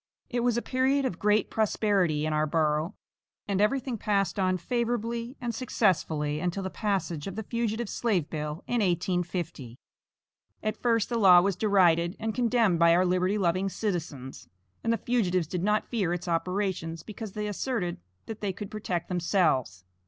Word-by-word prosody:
It 245 - 0
was 240 -1 +1
a 235 - -1
period 265 +2 +1
of 185 -9 -3
great 210 0 +2
prosperity 195 -8 +1
in 155 - -1
our 155 0 +1
borough, 155 +3 0 0.5
and 200 -1 0
everything 250 +1 0
passed 200 -1 0
on 185 -1 +2
favorably 235 - -2
and 240 -3 -3
successfully 160 - 0
until 180 +3 -2
the 190 - -4
passage 195 -7 -2
of 195 - -5
the 220 - -4
fugitive 230 0 -2
slave 200 -9 0
bill 150 +1 -5
in 245 - 0
1850. 175 - -2 0.9
At 215 - -2
first 230 -3 +2
the 235 -1 0
law 185 -4 +8
was 195 0 +1
derided 180 -3 +3
and 220 0 -2
condemned 230 -7 +2
by 170 0 +6
our 180 +1 +3
liberty 185 +3 +1
loving 185 0 +1
citizens, 165 - -4 0.3
and 230 - +1
the 230 - +2
fugitives 185 -9 +1
did 175 +3 -3
not 210 +1 +2
fear 195 -8 0
its 180 - -7
operations 170 -1 -2
because 215 -1 -8
they 210 0 -3
asserted 205 -3 -2 0.3
that 220 -1 -7
they 200 -2 -1
could 200 +1 -7
protect 180 -5 -3
themselves. 160 - +1
195 Hz, 165 wpm, -28 LUFS, 170-220 Hz, 0.9 s, law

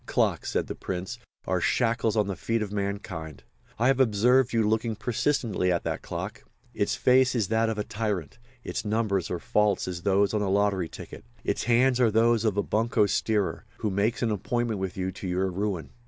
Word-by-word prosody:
"Clocks," - - 0
said - - 0
the - - -5
Prince, 90 0 -5 0.3
"are - - 0
shackles 115 -2 +1
on 105 - +3
the 100 -1 -3
feet 115 +5 -1
of 100 - -6
mankind. 100 -7 -4 0.3
I 115 - +1
have 135 0 +3
observed 125 +2 +4
you 115 -2 +2
looking 110 +1 0
persistently 110 -3 0
at 85 - 0
that - - -3
clock. - - -6 0.3
Its - - 0
face 130 0 +4
is 110 -6 0
that 110 0 +2
of 110 - -2
a 105 - -1
tyrant, 105 -4 -3 0.2
its - - -4
numbers 105 -4 0
are 90 - -2
false 105 +4 +1
as 90 -2 -4
those 100 +2 +2
on 105 - +1
a 100 - 0
lottery 100 -3 +1
ticket; - - -10 0.2
its - - -1
hands 125 +1 +3
are 120 -3 +5
those 115 +1 +3
of 105 -2 +1
a 100 - +2
bunco 110 +1 +2
steerer, 105 -1 0
who 105 -2 -2
makes 105 +6 0
an 115 - +1
appointment 115 +1 -1
with 95 -1 -4
you 95 0 -2
to 95 +1 -7
your 95 +1 0
ruin. 95 -2 -3
105 Hz, 200 wpm, -27 LUFS, 95-115 Hz, 0.3 s, are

